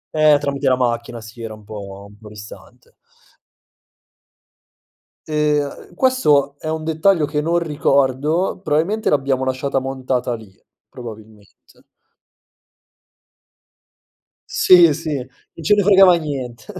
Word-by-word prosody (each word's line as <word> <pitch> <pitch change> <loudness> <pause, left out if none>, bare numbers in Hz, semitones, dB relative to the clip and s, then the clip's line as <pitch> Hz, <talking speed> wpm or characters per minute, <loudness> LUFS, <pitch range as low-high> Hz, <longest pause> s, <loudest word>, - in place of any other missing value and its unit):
Eh, 155 -1 +5
tramite 140 -1 -3
la 130 - +4
macchina 120 -1 -2
si 115 +2 -12
era 110 -1 -7
un 105 - -17
po' 100 -2 -9
un 100 - -17
po' 105 - -13
distante. 105 +3 -14 2.3
Ehm, 150 0 -2
questo 150 - +2
è - - -8
un 160 0 -3
dettaglio 160 +1 +2
che 150 0 -3
non 165 +3 0
ricordo, 150 +2 0
probabilmente 175 +6 0
l'abbiamo 135 -2 0
lasciata 130 +1 -1
montata 130 -2 -3
lì, 110 -4 -14 0.4
probabilmente. 110 -3 -12 3.0
Sì, 175 -4 +6
sì. 160 -1 -4
Non 130 +5 -12
ce 205 +6 +4
ne 205 - +2
fregava 195 -2 +6
nient 135 -8 -6
140 Hz, 115 wpm, -19 LUFS, 120-155 Hz, 3.0 s, Sì